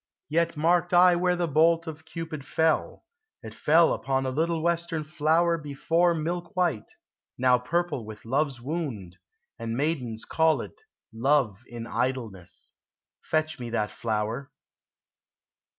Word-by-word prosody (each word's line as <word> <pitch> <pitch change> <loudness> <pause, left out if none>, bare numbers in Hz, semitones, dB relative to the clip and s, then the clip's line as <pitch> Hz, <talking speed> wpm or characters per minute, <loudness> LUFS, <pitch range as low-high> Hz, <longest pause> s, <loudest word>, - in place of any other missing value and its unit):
Yet 170 +1 +1
marked 175 +3 +2
I 180 0 +7
where 180 +1 +2
the 175 -1 -1
bolt 165 +2 +3
of 160 -1 -8
Cupid 165 -4 -6
fell: 160 +2 0 0.4
It 110 -1 -8
fell 165 +6 +4
upon 135 0 -1
a 130 - -1
little 160 +3 0
western 170 -2 0
flower 160 +3 +2
Before 165 +4 +1
milk 170 +4 -3
white, 175 -12 0 0.4
now 125 0 +4
purple 150 +1 -1
with 110 0 -10
love's 135 +1 0
wound, 125 - -5 0.4
And 115 0 -3
maidens 130 -7 -2
call 160 -5 +2
it - - -11 0.3
Love 120 -4 +1
in 120 -1 -7
idleness. 115 -8 -3 0.5
Fetch 155 -1 -1
me 120 -1 -5
that 110 -2 -1
flower. 110 +4 -2
150 Hz, 135 wpm, -27 LUFS, 120-165 Hz, 0.5 s, I